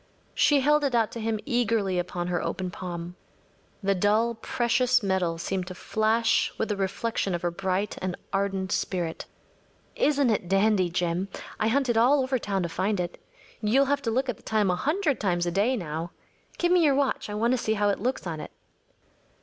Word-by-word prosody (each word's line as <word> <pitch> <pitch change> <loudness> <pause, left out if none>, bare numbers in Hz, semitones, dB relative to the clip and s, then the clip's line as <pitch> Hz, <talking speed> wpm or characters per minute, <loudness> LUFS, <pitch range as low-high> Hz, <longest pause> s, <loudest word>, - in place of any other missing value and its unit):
She 290 -2 +4
held 295 +2 +3
it 270 -4 +1
out 225 -2 +2
to 235 - -6
him 220 -1 -1
eagerly 230 -8 +1
upon 175 0 -3
her 175 -1 -1
open 185 -1 -3
palm. 175 -1 -6 0.7
The 195 0 +3
dull 210 +5 +2
precious 245 +2 +1
metal 185 -4 0
seemed 185 +2 -3
to 185 - -7
flash 225 +3 +1
with 220 - -1
a - - 0
reflection 195 0 -1
of 175 - -5
her 175 - 0
bright 190 +3 -2
and 185 -1 -2 0.2
ardent 195 -1 -1
spirit. 175 -3 -2 0.7
“Isn’t 285 -4 +2
it 210 - 0
a - - -11
dandy, 195 -1 +3
Jim? 175 +2 -1 0.3
I 215 - +2
hunted 240 -1 +2
all 265 +4 +4
over 260 0 0
town 195 -3 -1
to 170 - -2
find 200 +4 -1
it. 175 -1 -4 0.4
You’ll 240 +6 +3
have 280 +1 0
to 245 - -2
look 260 +4 0
at 245 -5 -2
the - - -20
time 210 -4 +1
a - - +1
hundred 305 - 0
times 175 -4 0
a 175 - -1
day 210 +8 +2
now. 165 -2 -4 0.5
Give 350 0 +1
me 360 -2 +5
your 285 -3 +4
watch. 275 -5 0
I 210 - -4
want 230 +3 +1
to 255 - +3
see 220 -1 0
how 205 0 +2
it 200 - 0
looks 250 +2 -2
on 165 -3 -4
it. - - -7
210 Hz, 205 wpm, -26 LUFS, 185-245 Hz, 0.7 s, me